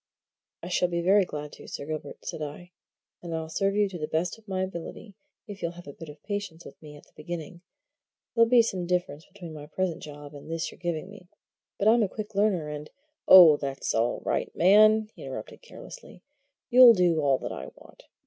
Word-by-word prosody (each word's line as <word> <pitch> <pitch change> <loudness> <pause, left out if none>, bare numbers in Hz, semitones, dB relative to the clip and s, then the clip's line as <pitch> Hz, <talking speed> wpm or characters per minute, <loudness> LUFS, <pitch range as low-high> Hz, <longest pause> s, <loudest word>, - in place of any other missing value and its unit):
"I - - -6
shall 180 0 +1
be 170 -1 -2
very 195 +2 +4
glad 150 -3 -7
to, - - -13
Sir - - -7
Gilbert," 155 0 -7
said - - -5
I. 155 +4 -7 0.5
"And 170 -2 -5
I'll 160 0 -5
serve 195 +4 -1
you 210 -1 +2
to 180 -3 -8
the 155 - -3
best 165 +4 -1
of 220 - -27
my 190 -1 -2
ability, 190 +3 -8 0.3
if 205 -4 -10
you'll 170 0 -3
have 175 0 -13
a 145 - -9
bit 165 +1 -11
of 150 0 -14
patience 205 -5 -5
with - - -14
me 150 -1 -12
at 145 - -15
the - - -26
beginning. 170 +1 -7 0.7
There'll 230 -1 +4
be 240 -1 +6
some 185 -6 -3
difference 175 -4 -2
between 180 -5 -11
my 150 -1 -10
present 175 +1 -3
job 145 -1 -10
and 145 +2 -12
this 165 -1 -3
you're - - -17
giving 175 -1 -3
me, 200 -3 -14 0.5
but 200 - 0
I'm 230 +2 +5
a 205 - +1
quick 215 +1 -7
learner, 195 -6 +1
and 150 0 -7 0.2
" - - -53
"Oh, 170 -5 +9
that's 135 -2 -4
all 115 +2 0
right, - - -1
man!" 215 +4 +5
he - - -15
interrupted - - -8
carelessly. - - -13 0.5
"You'll 245 -1 +9
do 175 -4 +2
all 140 -2 +2
that - - -6
I - - -7
want. - - -18
175 Hz, 215 wpm, -27 LUFS, 155-200 Hz, 0.7 s, Oh